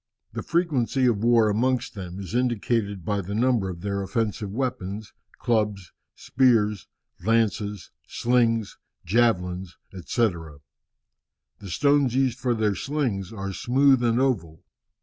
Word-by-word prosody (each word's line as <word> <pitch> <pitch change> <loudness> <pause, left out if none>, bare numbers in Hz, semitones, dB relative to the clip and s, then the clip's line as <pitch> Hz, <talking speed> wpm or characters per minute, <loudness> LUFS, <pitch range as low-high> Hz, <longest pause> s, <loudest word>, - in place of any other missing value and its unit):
The - - -4
frequency 140 -7 0
of 115 -4 +1
war 115 -2 +5
amongst 125 +4 0
them 95 -3 -7
is 95 0 -7
indicated 115 -6 -1
by 100 0 0
the 100 +3 -5
number 115 -4 +1
of 85 -2 -7
their 100 0 -2
offensive 105 +1 -2
weapons, 110 -4 -4 0.2
clubs, 105 -6 -1 0.2
spears, 115 -6 +2 0.4
lances, 105 -2 0 0.2
slings, 115 -3 +1 0.3
javelins, 90 -4 0 0.2
&c. 95 +6 0 1.3
The 100 - -9
stones 140 - +2
used 130 -2 +1
for 125 -1 0
their 110 -2 +1
slings 115 -8 -2
are 100 -3 -5
smooth 130 +4 +3
and 120 0 +2
oval. 95 -13 -1
110 Hz, 125 wpm, -25 LUFS, 100-125 Hz, 1.3 s, war